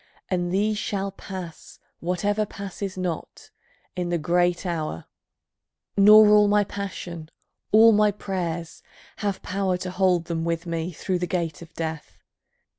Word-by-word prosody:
And 175 -2 -1
these 210 +2 +1
shall 200 -1 -2
pass, 185 -3 -9 0.2
Whatever 205 +5 0
passes 200 -1 -6
not, 180 -3 -5 0.4
in 180 -1 -2
the 175 - +1
great 175 +3 +1
hour, 160 - -3 0.9
Nor 210 +2 +8
all 210 0 +6
my 205 0 +4
passion, 180 -5 -6 0.4
all 225 +2 +8
my 210 0 +4
prayers, 175 -5 -4 0.4
have 200 -2 -3
power 190 -1 -1
To 180 0 -5
hold 185 -2 +2
them 165 -1 -2
with 170 +1 -2
me 170 +1 -3
through 180 +2 -2
the 180 - -2
gate 170 -4 -2
of 170 - -12
Death. 160 -1 -5
180 Hz, 140 wpm, -25 LUFS, 170-200 Hz, 0.9 s, Nor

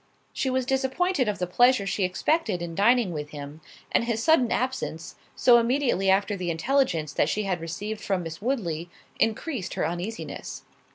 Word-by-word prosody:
She 265 - -1
was 260 0 0
disappointed 270 - +1
of 210 - -1
the 180 - -1
pleasure 245 +4 +4
she 195 0 -1
expected 185 - 0
in 170 -1 -5
dining 225 +2 +3
with 150 -1 -5
him; 145 +1 -9 0.3
and - - +2
his 230 -1 -1
sudden 260 -7 +4
absence, 240 -11 -2 0.2
so 240 -2 +6
immediately 235 -5 +1
after 200 +2 +2
the 180 -2 -3
intelligence 165 - 0
that - - +2
she 210 - -1
had 185 -4 -2
received 205 +6 -5
from 190 -3 -1
Miss 165 +1 -7
Woodley, 175 - -2 0.3
increased 225 - -1
her - - 0
uneasiness. 175 +7 -5
210 Hz, 170 wpm, -26 LUFS, 175-255 Hz, 0.3 s, so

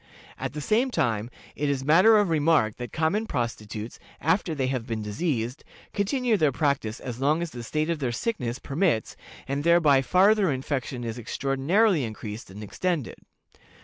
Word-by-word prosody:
"At - - -4
the 150 - -5
same 230 - +2
time, 115 - 0 0.3
it 145 0 -1
is 135 -2 -1
matter 185 +9 +6
of 205 -3 +2
remark 150 -8 +2
that 120 0 -6
common 165 +8 0
prostitutes, 115 - -4 0.2
after 165 0 +1
they 135 -3 0
have 130 -3 -2
been 110 -2 -3
diseased, 120 +2 -2 0.3
continue 230 +3 +1
their 155 -5 +3
practices 130 -5 -1
as 125 -2 -6
long 155 +5 +2
as 170 - -5
the 120 - -7
state 155 +7 -1
of 165 - -2
their 130 -4 -1
sickness 120 - -2
permits, 140 - 0 0.3
and 140 +2 -2
thereby 160 -5 +5
farther 190 - +4
infection 130 -1 -3
is 115 +1 -4
extraordinarily 140 - +1
increased 110 -1 -6
and 100 +3 -9
extended. 160 - -3
140 Hz, 165 wpm, -26 LUFS, 120-170 Hz, 0.3 s, matter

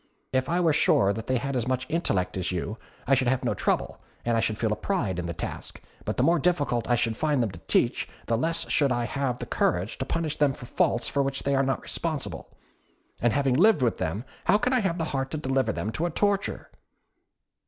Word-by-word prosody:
If 130 0 +1
I 175 +2 +2
were 165 -3 +3
sure 100 -8 +4
that 110 +2 -6
they 130 - +2
had 140 +3 -3
as 120 -1 -1
much 130 0 0
intellect 95 - 0
as 95 -1 -2
you, 95 +5 -3 0.3
I 135 - +3
should 130 -1 +3
have 130 0 +1
no - - +2
trouble, - - -1 0.2
and 120 -1 +2
I - - +3
should 110 -1 0
feel 110 -1 +1
a - - -1
pride 105 - -1
in 85 - -3
the 85 - -3
task; 85 - -6 0.3
but - - -2
the - - +3
more 170 +1 +4
difficult 145 -9 +1
I 120 - +5
should 115 -1 0
find 145 -1 +1
them 110 - -2
to 85 - -11
teach, - - +1 0.2
the 115 - +1
less 165 +8 -1
should 140 -3 +2
I 120 -1 +1
have 135 -1 -1
the - - -5
courage 90 +4 0
to 130 - -1
punish 160 +1 -2
them 145 -2 +3
for 125 - -10
faults 120 0 +1
for 140 - +1
which 135 0 -2
they 140 - +1
are 135 - +3
not 135 0 -1
responsible. 140 - -3 0.7
And 120 - +3
having 135 +1 +2
lived 180 - +5
with 115 - +1
them, 95 +9 -2 0.2
how - - +5
can 250 +4 0
I 255 - +4
have 190 -6 0
the 165 - -1
heart 135 -1 -1
to 155 - -3
deliver 130 -5 0
them 110 - -3
to 165 +9 -1
a - - -2
torture?" 200 +4 -1
130 Hz, 240 wpm, -27 LUFS, 115-155 Hz, 0.7 s, I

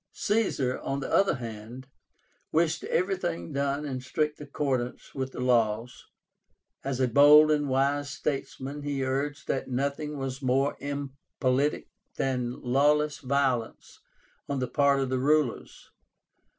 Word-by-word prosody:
Caesar, 195 - 0
on 135 - -3
the 135 - -4
other 195 -4 +4
hand, 115 +1 -8 0.7
wished 165 0 +1
everything 180 - -1
done 140 +1 -1
in 130 -3 -4
strict 150 +4 -2
accordance 135 -4 -3
with 130 -1 -3
the - - -8
laws; 120 -1 0 0.8
as 135 -1 -2
a 130 - +3
bold 145 +4 +7
and 145 -2 +1
wise 140 +2 +1
statesman, 140 0 -4
he 140 -2 -2
urged 140 +3 -2
that 135 - -2
nothing 140 +3 -2
was 135 0 -4
more 135 +2 +1
impolitic 140 0 -2 0.3
than 125 -2 -2
lawless 145 +4 +2
violence 130 -4 -1 0.5
on 140 - -1
the 130 -1 -1
part 140 0 +3
of 135 -1 -1
the 130 0 0
rulers. 145 -2 0
140 Hz, 130 wpm, -28 LUFS, 130-145 Hz, 0.8 s, bold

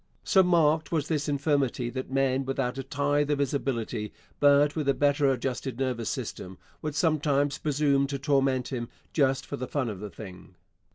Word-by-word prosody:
So 190 - +5
marked 160 -3 +3
was 155 -3 0
this 150 -2 -1
infirmity 140 -4 0
that 130 0 -5
men 135 0 +1
without 135 -1 -2
a - - -3
tithe 145 +1 0
of 145 - +2
his 140 -1 0
ability, 115 -6 -2 0.3
but 145 0 +5
with 150 -3 -1
a 135 - +3
better 145 -1 +3
adjusted 130 -1 -3
nervous 125 -4 -2
system, 95 0 -5 0.2
would 155 -1 -4
sometimes 145 -3 +1
presume 140 -2 +1
to 140 0 -3
torment 135 -2 +1
him 120 -3 -4 0.2
just 135 -3 +2
for - - -5
the 130 - -4
fun 130 -3 -1
of 100 -4 -6
the 105 +1 -6
thing. 95 -3 -11
140 Hz, 180 wpm, -27 LUFS, 130-145 Hz, 0.3 s, So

